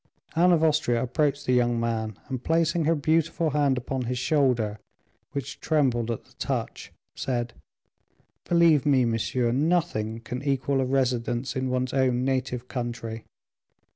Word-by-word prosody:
Anne 175 Hz, +2 st, +5 dB
of 165 Hz, -2 st, +3 dB
Austria 150 Hz, -7 st, +2 dB
approached 145 Hz, +2 st, 0 dB
the 125 Hz, -, +2 dB
young 120 Hz, -1 st, +2 dB
man, 110 Hz, -3 st, -2 dB
and 130 Hz, -3 st, -5 dB
placing 165 Hz, 0 st, +1 dB
her 165 Hz, +2 st, +3 dB
beautiful 160 Hz, +1 st, +1 dB
hand 140 Hz, -2 st, +2 dB
upon 125 Hz, +1 st, -3 dB
his 125 Hz, +1 st, -2 dB
shoulder, 120 Hz, -7 st, +1 dB, 0.5 s
which 140 Hz, -4 st, -5 dB
trembled 130 Hz, -7 st, +1 dB
at 115 Hz, -, -4 dB
the -, -, -23 dB
touch, -, -, -3 dB, 0.2 s
said, 120 Hz, -2 st, -2 dB, 0.9 s
"Believe 170 Hz, -4 st, +4 dB
me, 135 Hz, -4 st, +3 dB
monsieur, 115 Hz, +1 st, 0 dB
nothing 135 Hz, -7 st, 0 dB
can 120 Hz, +3 st, -6 dB
equal 135 Hz, -1 st, 0 dB
a -, -, +1 dB
residence 125 Hz, -1 st, 0 dB
in 130 Hz, 0 st, -1 dB
one's 125 Hz, 0 st, -1 dB
own 130 Hz, -2 st, +2 dB
native 130 Hz, -2 st, -2 dB
country. 115 Hz, -3 st, -5 dB
130 Hz, 145 wpm, -26 LUFS, 120-150 Hz, 0.9 s, Anne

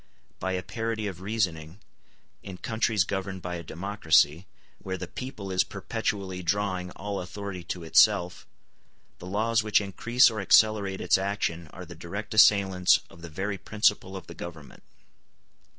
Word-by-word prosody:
By 95 Hz, -, -2 dB
a 90 Hz, 0 st, -2 dB
parity 115 Hz, -2 st, -3 dB
of 95 Hz, -3 st, -5 dB
reasoning, 95 Hz, -5 st, -2 dB, 0.6 s
in 95 Hz, -2 st, -9 dB
countries 110 Hz, -1 st, +1 dB
governed 95 Hz, -1 st, -4 dB
by 90 Hz, -1 st, -4 dB
a 85 Hz, -, -8 dB
democracy, 85 Hz, -1 st, +1 dB, 0.3 s
where 95 Hz, -1 st, -4 dB
the -, -, -5 dB
people 110 Hz, -7 st, -7 dB
is 95 Hz, -, +3 dB
perpetually 95 Hz, -3 st, -4 dB
drawing 95 Hz, 0 st, -1 dB
all 100 Hz, +2 st, -5 dB
authority 95 Hz, 0 st, -6 dB
to 85 Hz, 0 st, -5 dB
itself, 85 Hz, +2 st, +3 dB, 0.7 s
the 90 Hz, -, -9 dB
laws 110 Hz, +4 st, +1 dB
which 105 Hz, -1 st, +3 dB
increase 120 Hz, +5 st, +3 dB
or 110 Hz, -2 st, -4 dB
accelerate 100 Hz, -1 st, +3 dB
its -, -, +3 dB
action 95 Hz, -4 st, -2 dB
are 90 Hz, +4 st, -10 dB
the 85 Hz, -, -10 dB
direct 90 Hz, +6 st, -6 dB
assailants 95 Hz, -4 st, +5 dB
of 85 Hz, -, -15 dB
the 85 Hz, -, -8 dB
very 95 Hz, +5 st, -3 dB
principle 105 Hz, -3 st, 0 dB
of 90 Hz, -, -10 dB
the -, -, -10 dB
government. 80 Hz, -4 st, -10 dB
95 Hz, 150 wpm, -27 LUFS, 90-105 Hz, 0.7 s, assailants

